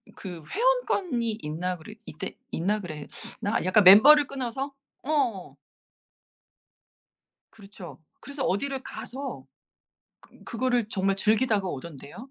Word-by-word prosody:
그 175 -5 -8
회원권이 370 - 0
있나 175 +4 -3
그래 175 +6 -12
있대 155 - -7 0.2
있나 205 +6 0
그랬나? 180 +5 -5
약간 195 +3 +4
멤버를 275 +11 +9
끊어서? 270 +1 -4 0.3
어. 260 -10 -1 2.0
그렇죠. 195 -4 -12 0.2
그래서 280 -1 -5
어디를 265 +7 -1
가서 270 +2 -7 0.8
그 - - -20
그거를 245 -2 0
정말 195 -2 0
즐기다가 215 -1 +2
오던데요? 170 - -9
215 Hz, 245 characters per minute, -26 LUFS, 185-270 Hz, 2.0 s, 멤버를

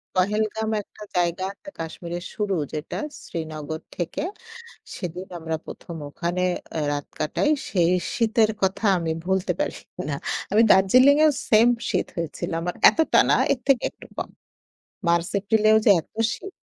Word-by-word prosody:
'পহেলগাম' 215 +3 0
একটা 210 - -14
জায়গা 175 +1 +1
আছে, 200 +9 -12
কাশ্মীরের 170 +2 -5
শুরু 205 -2 -1 0.2
যেটা 150 0 -4 0.3
শ্রীনগর 160 -1 -5
থেকে। 175 - -3 0.8
সেদিন 180 +2 -5
আমরা 160 0 -3
১ম 170 -2 -8
ওখানে 175 +4 -2 0.3
অ্যা 160 - -2
রাত 145 0 -3
কাটাই। 295 - 0 0.2
সেই 175 -2 +2 0.2
শীতের 225 -3 +3
কথা 190 +3 0
আমি 165 -1 -2
ভুলতে 190 -1 +1
পারি - - -1 0.3
না। 140 - -1 0.4
আমি 220 +2 +6
দার্জিলিংএও 265 +10 +6 0.2
সেইম 225 +2 +6 0.2
শীত - - 0
হয়েছিল 165 -2 -4
আমার। 175 +1 -3
এতটা 320 - +3
না, - - +6 0.2
এর 255 - -3
থেকে 270 -3 +4
একটু - - -15
কম। - - -3 0.8
মার্চ-এপ্রিলেও 200 +5 +3
যে - - +6
এত - - -32 0.2
শীত! 390 - -8
185 Hz, 140 wpm, -24 LUFS, 170-220 Hz, 0.8 s, আমি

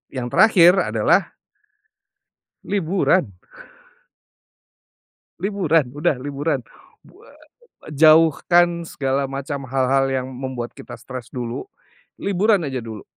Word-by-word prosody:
yang 125 -2 -3
terakhir 180 -6 +6 0.2
adalah 110 -1 +1 1.3
liburan! 185 - 0 2.0
Liburan, 170 -8 +1
udah 150 -3 0
liburan. 145 +2 -2 0.4
Bu - - -21
eee, - - -21 0.4
jauhkan 165 +3 +4
segala 135 -1 -2
macam 140 0 -6
hal-hal 135 +1 +1
yang 130 -1 -2
membuat 130 -2 -6
kita - - -11
stres 120 0 -9
dulu, 120 - -6 0.5
liburan 200 0 +1
aja 135 -3 -3
dulu. 110 -3 -9
140 Hz, 95 wpm, -21 LUFS, 130-170 Hz, 2.0 s, terakhir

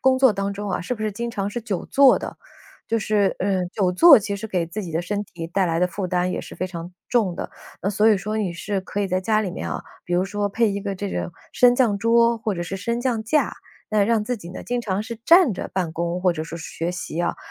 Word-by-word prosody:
工 260 0 +4
作 260 -3 +6
当 200 0 -2
中 205 0 -5
啊， 180 - -1
是 190 +8 -3
不 215 - -7
是 215 -1 -1
经 235 +4 -4
常 200 -3 -2
是 240 +4 -4
久 210 -6 -3
坐 275 -2 +6
的？ - - -7 0.5
就 230 - +1
是， 210 -2 +1
呃， 190 -1 0
久 185 0 0
坐 280 - +8
其 205 -1 -3
实 215 +2 -6
给 180 -4 0
自 200 +6 -5
己 175 - -6
的 160 +1 0
身 205 +3 -2
体 175 -4 -8
带 190 +3 +1
来 165 -2 0
的 180 - +3
负 185 +1 -4
担 180 0 0
也 - - -2
是 - - -10
非 185 - -2
常 175 -1 -7 0.2
重 215 -8 +1
的。 - - -4 0.3
呃， 195 - 0
所 210 +2 +3
以 210 - +5
说 215 +3 -3
你 200 -5 -1
是 195 +3 -3
可 195 +2 -4
以 200 - +1
在 185 0 0
家 215 +3 +2
里 210 - -2
面 - - -5
啊， - - -3 0.2
比 175 - -5
如 180 +1 +3
说 205 +1 -2
配 225 +3 +2
一 200 - -3
个 200 -1 -4
这 200 +2 -3
种 190 - -3 0.2
升 245 -1 +6
降 235 -6 +3
桌 230 +2 +4
或 220 -1 -2
者 175 -2 -3
是 195 +2 -4
升 235 +5 -2
降 240 -3 0
架， 270 +8 +1 0.4
那 215 -1 +3
让 220 +1 +2
自 245 +2 -2
己 175 -5 -10
呢， 185 - -8
经 245 0 -1
常 200 -4 -2
是 235 - -5
站 340 - +6
着 - - -6
办 180 -4 -1
公 170 +2 -2
或 180 -1 +3
者 155 -2 -4
说 165 +1 -7
是 165 - -7
学 165 +2 -3
习 180 -2 -4
啊。 170 - -1
200 Hz, 300 characters per minute, -23 LUFS, 180-225 Hz, 0.5 s, 坐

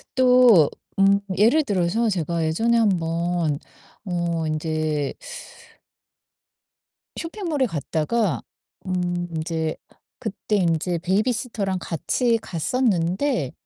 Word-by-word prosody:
또 250 - +6 0.3
음 195 +1 +5 0.2
예를 235 +10 +4
들어서 205 +1 +1
제가 170 -3 -1
예전에 225 +9 +2
한번 170 -6 +1 0.5
어 170 -3 -1
인제 155 -2 -1 2.0
쇼핑몰에 330 -6 -2
갔다가 165 - -1 0.4
음 175 -1 -1
인제 160 0 -2 0.4
그때 215 -1 -2
인제 170 -1 +1
베이비시터랑 200 +1 -1
같이 230 - 0
갔었는데 185 - 0
180 Hz, 190 characters per minute, -23 LUFS, 165-230 Hz, 2.0 s, 또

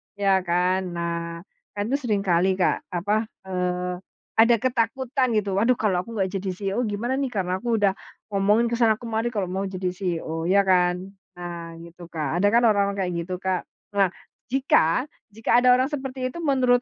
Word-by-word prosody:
Ya 195 -1 +3
kan? 180 +2 +2 0.2
Nah, 170 0 -3 0.3
kan 205 - -1
itu 275 - +2
seringkali 195 -5 +2
Kak, 180 - +3 0.2
apa, 205 +5 0 0.2
eee, 180 0 -1 0.4
ada 230 +1 +6
ketakutan 255 +2 0
gitu, 200 -2 0
"Waduh, 245 +3 +3
kalau 190 -5 +1
aku 230 +4 -9
nggak 190 -1 +1
jadi 190 0 -4
CEO 195 +4 -2
gimana 215 +5 -2
nih? 275 -2 -1
Karena 190 -5 -2
aku 235 -1 +1
udah 205 -2 +3 0.4
ngomongin 205 +4 +3
ke - - -1
sana 225 -2 +4
kemari 225 0 -2
kalau 205 -5 -2
mau 195 +1 -2
jadi 185 -1 -3
CEO." 170 -3 -3
Ya 200 +1 +5
kan? 180 +1 +2 0.2
Nah, 170 -1 -7
gitu, 170 0 -12
Kak. 155 0 -2
Ada 205 - +4
kan 235 +3 +4
orang-orang 200 -2 +3
kayak 180 - -2
gitu, 180 +2 -4
Kak. 185 -1 -2 0.3
Nah, 200 -1 +4 0.4
jika 250 - +3 0.3
jika 225 +2 +3
ada 250 - +4
orang 260 +3 +1
seperti 265 -3 -3
itu 340 - -8
menurut 255 -5 +3
200 Hz, 180 wpm, -24 LUFS, 180-235 Hz, 0.4 s, ada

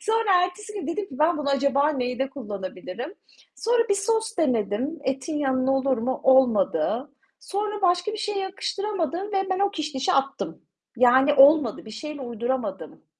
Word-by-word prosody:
Sonra, 430 -5 +2
ertesi 420 +4 -7
gün 400 -8 -5
dedim 335 +5 -2
ki 260 - -10
ben 315 +1 +3
bunu 285 -1 -1
acaba 280 +1 +2
neyde 265 -1 -2
kullanabilirim. 210 - -7 0.4
Sonra 465 0 +1
bir 400 - +3
sos 445 +2 -1
denedim, 255 - 0
etin 270 +4 -2
yanına 265 -1 +1
olur 265 -2 +1
mu, 255 +3 -2
olmadı. 245 - +3 0.3
Sonra, 415 +1 -3
başka 360 +3 +2
bir - - -4
şeye 415 -1 -2
yakıştıramadım 385 -1 -3
ve 390 -1 0
ben 375 - 0
o 400 0 +2
kişnişi 300 -7 -2
attım. 275 0 -1 0.3
Yani 260 +4 +5
olmadı, 275 -5 +5
bir 220 - -10
şeyle 290 +6 -7
uyduramadım. 245 +3 -4
290 Hz, 155 wpm, -24 LUFS, 260-385 Hz, 0.4 s, Yani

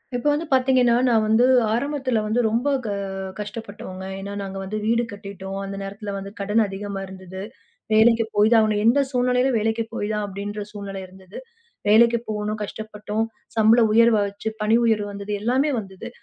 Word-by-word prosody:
இப்ப 245 - -4
வந்து 295 +3 -1
பாத்தீங்கன்னா, 255 -2 +4
நான் 225 -2 +3
வந்து 220 +3 +4 0.3
ஆரம்பத்துல 260 -2 0
வந்து 215 +3 0
ரொம்ப 235 +6 0 0.2
க - - -2 0.5
கஷ்டப்பட்டோங்க. 205 -3 -7 0.2
ஏன்னா 200 +1 -6
நாங்க 195 0 -6
வந்து 200 +3 -4
வீடு 230 +2 +2
கட்டிட்டோம். 195 -1 -7
அந்த 195 0 -6
நேரத்துல 200 +1 -6
வந்து 195 0 -7
கடன் 210 +3 +2
அதிகமா 195 0 -5
இருந்தது. 190 0 -9 0.5
வேலைக்குப் 225 0 +4
போய்தான் 220 +3 +5
ஆகணும். 215 -1 +1
எந்தச் 265 +4 +3
சூழ்நிலையிலும் 250 0 +2
வேலைக்குப் 225 +1 -1
போய்தான் 210 -1 -2
அப்டின்ற 205 +1 -5
சூழ்நிலை 200 -2 -6
இருந்தது. 190 +1 -13 0.5
வேலைக்குப் 235 +2 +4
போனோம், 210 0 -2
கஷ்டப்பட்டோம். 215 +1 -4 0.3
சம்பள 220 +2 +6
உயர்வு 230 -1 +5
வச்சு 200 +2 -5
பணி 215 +2 +3
உயர்வு 215 -2 +1
வந்தது, 200 +1 -6
எல்லாமே 260 +6 +2
வந்தது. 195 +3 -9
215 Hz, 155 wpm, -23 LUFS, 200-235 Hz, 0.5 s, சம்பள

